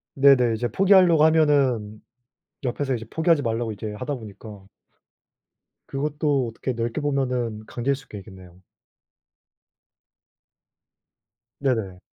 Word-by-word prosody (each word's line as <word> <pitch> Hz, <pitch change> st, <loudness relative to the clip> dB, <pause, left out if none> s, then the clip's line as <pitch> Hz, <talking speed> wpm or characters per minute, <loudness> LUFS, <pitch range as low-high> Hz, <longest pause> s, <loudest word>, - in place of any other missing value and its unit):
네네. 135 Hz, -4 st, +5 dB
이제 120 Hz, +2 st, -2 dB
포기하려고 180 Hz, -, +5 dB
하면은 135 Hz, -9 st, +2 dB, 0.6 s
옆에서 135 Hz, +1 st, -1 dB
이제 115 Hz, -1 st, -7 dB
포기하지 160 Hz, -1 st, +2 dB
말라고 115 Hz, -2 st, -2 dB
이제 105 Hz, +1 st, -6 dB
하다 130 Hz, +6 st, -4 dB
보니까 105 Hz, -2 st, -11 dB, 1.2 s
그것도 145 Hz, -2 st, -1 dB
어떻게 115 Hz, +3 st, -4 dB
넓게 115 Hz, +3 st, -3 dB
보면은 125 Hz, -6 st, -2 dB
강제일 130 Hz, +5 st, -2 dB
수가 135 Hz, -6 st, -11 dB
있겠네요. 95 Hz, -3 st, -14 dB, 3.0 s
네네. 110 Hz, -10 st, -1 dB
125 Hz, 260 characters per minute, -23 LUFS, 110-145 Hz, 3.0 s, 네네